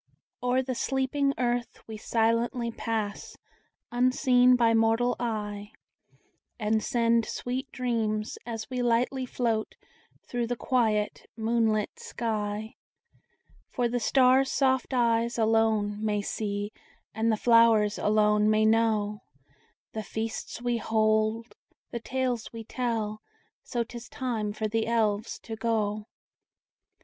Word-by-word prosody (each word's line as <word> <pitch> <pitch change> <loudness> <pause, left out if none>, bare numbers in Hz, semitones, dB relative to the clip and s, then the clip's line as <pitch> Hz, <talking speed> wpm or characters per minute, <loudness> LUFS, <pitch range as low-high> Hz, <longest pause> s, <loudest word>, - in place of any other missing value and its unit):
O'er 250 +1 +1
the 255 0 -3
sleeping 270 +2 0
earth 245 -1 -1
we 220 - -8
silently 230 +2 0
pass, 220 -3 -4 0.5
Unseen 250 0 +4
by 230 -2 +3
mortal 225 +2 +2
eye, 210 -3 -3 0.9
And 215 0 +1
send 230 -1 +2
sweet 260 +2 -4
dreams, 220 -4 -2
as 225 -2 -5
we 255 -1 -3
lightly 245 +2 +1
float 230 -3 -1 0.5
Through 240 -1 -2
the 245 - -1
quiet 220 -4 0
moonlit 220 -1 0
sky;— 215 -1 -3 1.0
For 245 -1 0
the 245 +1 -1
stars' 260 +3 +4
soft 265 -1 +1
eyes 235 -1 +1
alone 220 -2 +2
may 210 -1 0
see, 205 0 -3 0.4
And 225 +1 +1
the 215 - +1
flowers 230 -3 +4
alone 210 0 +3
may 215 0 +3
know, 215 -2 +2 0.7
The 220 - -4
feasts 220 +3 -5
we 240 -1 +1
hold, 220 +1 +1 0.4
the 235 - -3
tales 250 -1 -2
we 230 -1 -7
tell: 220 -3 -2 0.4
So 240 -2 -2
't 240 - -14
is 235 - -13
time 230 -6 -2
for 215 +1 -2
the 225 +1 -1
Elves 220 -2 0
to 225 - -6
go. 215 -2 -1
225 Hz, 120 wpm, -28 LUFS, 215-245 Hz, 1.0 s, Unseen